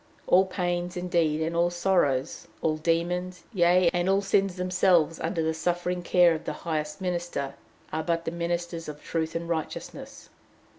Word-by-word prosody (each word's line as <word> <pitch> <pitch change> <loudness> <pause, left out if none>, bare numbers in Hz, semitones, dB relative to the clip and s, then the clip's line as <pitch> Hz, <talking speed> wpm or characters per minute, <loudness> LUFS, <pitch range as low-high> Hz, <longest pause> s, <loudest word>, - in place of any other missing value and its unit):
All 185 +1 +5
pains, 180 -1 -2
indeed, 170 -3 +1
and 165 +1 -2
all 170 +1 +3
sorrows, 175 -6 0 0.2
all 155 -1 +1
demons, 175 +2 -1
yea, 175 -1 +4
and 175 +1 +1
all 195 +1 +3
sins 195 -1 +2
themselves 180 -3 +2
under 165 -4 -1
the 160 0 0
suffering 175 +2 -1
care 175 -1 +5
of 160 - -5
the - - -2
highest 150 -1 -2
minister, 175 -6 -2 0.4
are 160 - 0
but 170 +1 -1
the 165 - -2
ministers 170 -1 -3
of 150 0 -9
truth 160 -1 -2
and 170 0 -3
righteousness. 160 -2 -5
175 Hz, 160 wpm, -27 LUFS, 160-180 Hz, 0.4 s, All